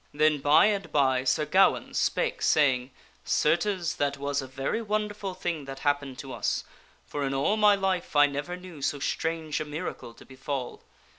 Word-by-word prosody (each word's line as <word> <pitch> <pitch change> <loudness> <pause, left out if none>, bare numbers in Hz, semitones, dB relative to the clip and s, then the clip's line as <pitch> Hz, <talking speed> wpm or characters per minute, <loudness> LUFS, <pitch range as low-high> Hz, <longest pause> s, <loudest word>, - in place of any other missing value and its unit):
Then, 155 0 +3
by 145 +2 +5
and 205 -2 0
by, 130 -3 +2
Sir 135 +3 +2
Gawaine 190 +6 +3
spake, - - 0
saying, 130 -4 +3 0.2
" - - -34
Certes, 175 +1 +1
that 140 0 0
was 140 0 -1
a 135 - -7
very 135 - -2
wonderful 210 -3 -3
thing 170 -5 -3
that 135 0 -8
happened 145 -3 -1
to 135 -1 -7
us, - - -1 0.4
for 145 - -4
in 135 0 -1
all 140 +10 +2
my 210 -1 +5
life 190 -5 -2
I 145 0 +7
never 145 +5 -4
knew 180 -5 -11
so 145 - 0
strange 160 +1 -2
a - - -1
miracle 150 -6 -6
to - - -15
befall. 130 -1 -5
150 Hz, 180 wpm, -27 LUFS, 140-185 Hz, 0.4 s, I